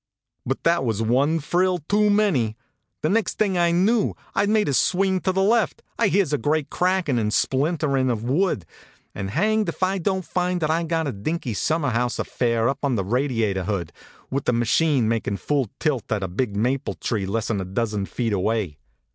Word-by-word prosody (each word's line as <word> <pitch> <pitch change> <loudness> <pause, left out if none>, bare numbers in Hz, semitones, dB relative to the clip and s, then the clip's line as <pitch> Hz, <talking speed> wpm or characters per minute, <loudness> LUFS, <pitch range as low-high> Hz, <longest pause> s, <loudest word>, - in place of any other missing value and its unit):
But 135 - -2
that 170 -4 +3
was 115 -3 -1
one 135 +8 +2
frill 180 +4 +1
too 210 +1 +3
many! 165 - +2 0.5
Next 205 +8 +1
thing 200 -3 +1
I 175 -1 +3
knew 200 +6 +2 0.2
I 200 - +2
d - - +1
made 215 -1 +2
a 140 - 0
swing 190 +6 +2
to 185 - 0
the 190 +1 +1
left, 225 +2 +1 0.2
I 230 - +4
hears 190 -6 +1
a 145 - +1
great 150 +4 0
crackin 180 -8 +1
and 105 -1 0
splin 140 +9 +1
terin 135 -4 +1
of 115 -2 -3
wood, 135 - 0 0.5
and 95 -1 -4
hanged 215 - +1
if - - -4
I 190 +1 +1
don 190 +2 0
t - - -21
find 180 0 0
that 155 0 +1
I 165 +1 +1
ve 165 - -4
got 165 0 0
that 130 -10 -5
dinky 155 -3 -2
summer 155 - 0
house 120 +1 0
af - - -2
fair 115 -2 0
up 135 +1 -1
on 140 -3 +1
the 95 -4 -1
radiator 115 -5 0
hood, 95 -5 -3 0.4
with 135 +1 -2
the 125 - +2
ma 120 0 +1
chine 140 -2 +2
makin 110 -3 -1
full 140 -3 -1
tilt 135 -9 -1
at 105 -3 0
a - - -1
big 100 +4 -2
maple 130 +5 0
tree 105 -5 -2
less 115 +3 -1
n 100 -3 -1
a - - -2
dozen 100 +1 -2
feet 115 -3 -2
away. 95 -6 -1
140 Hz, 215 wpm, -23 LUFS, 115-180 Hz, 0.5 s, I